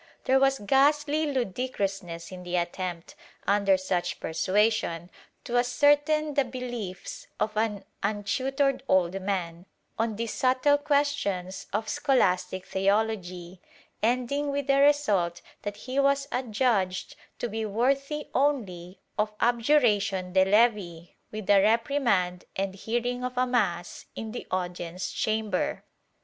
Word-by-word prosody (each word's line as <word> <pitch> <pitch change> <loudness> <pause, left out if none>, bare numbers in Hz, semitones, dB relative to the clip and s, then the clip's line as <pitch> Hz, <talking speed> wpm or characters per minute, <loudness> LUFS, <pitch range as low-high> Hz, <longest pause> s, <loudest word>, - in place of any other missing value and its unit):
There 265 +1 +4
was 270 0 +3
ghastly 290 +6 +2
ludicrousness 195 -9 -3
in 185 -1 -8
the 180 0 -4
attempt, 175 0 -3 0.3
under 200 -1 +3
such 185 -1 -2
persuasion, 185 0 0 0.3
to 245 0 +1
ascertain 290 +4 +3
the 280 - +3
beliefs 240 -7 -6
of 215 0 -1
an 210 -2 -1 0.2
imtutored 260 +7 0
old 185 +1 +2
man, 180 -2 -3 0.3
on 225 -1 0
these 230 +1 -3
subtle 260 +3 +3
questions 280 -11 -1
of 215 +2 -2
scholastic 190 -11 +1
theology, 190 -3 -1 0.4
ending 255 +5 0
with 280 0 -1
the 275 0 +3
result 210 -13 +2 0.2
that 205 0 -5
he 260 +2 -1
was 280 0 +2
adjudged 220 -6 0 0.2
to - - -2
be 220 0 -3
worthy 275 +7 0
only 195 -11 -1 0.2
of 210 0 +1
abjuration 225 -7 +2
de 190 0 +6
levi, 195 -5 +2 0.2
with 215 -2 -6
a 200 -1 +6
repri 230 +7 +2
mand 180 -7 +1
and 195 0 -2
hearing 240 +5 -2
of 250 0 -4
a 255 - +3
mass 210 -9 -1
in 220 -1 -5
the 245 - -7
audience 180 -1 -3
chamber. 215 -3 -1
215 Hz, 125 wpm, -27 LUFS, 185-260 Hz, 0.4 s, de